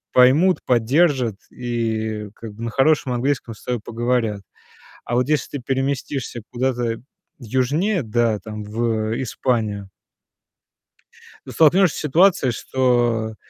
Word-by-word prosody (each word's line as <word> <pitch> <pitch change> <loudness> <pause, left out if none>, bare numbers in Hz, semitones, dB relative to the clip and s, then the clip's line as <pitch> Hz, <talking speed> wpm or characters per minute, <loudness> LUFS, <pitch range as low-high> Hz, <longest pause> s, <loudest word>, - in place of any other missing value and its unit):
поймут, 145 +9 +5
поддержат 125 - +2
и 110 -3 -3
как 110 -2 -9
бы 110 - -12
на - - -2
хорошем 135 +1 +2
английском 120 -2 -1
с - - -18
тобой 125 -3 -2
поговорят. 115 -3 -1 0.6
А 120 - -3
вот 125 +2 +2
если 150 -1 -1
ты 125 - -11
переместишься 135 -2 -2
куда-то 120 -2 -1 0.4
южнее, 140 - 0
да, 115 -2 0
там 105 +2 -7
в, 110 0 -1
э, 115 - -2
Испанию 110 -6 -2 1.6
ты - - -8
столкнешься 170 +2 +4
с - - -3
ситуацией, 155 -3 +3
что, 120 -3 0
120 Hz, 125 wpm, -21 LUFS, 110-135 Hz, 1.6 s, поймут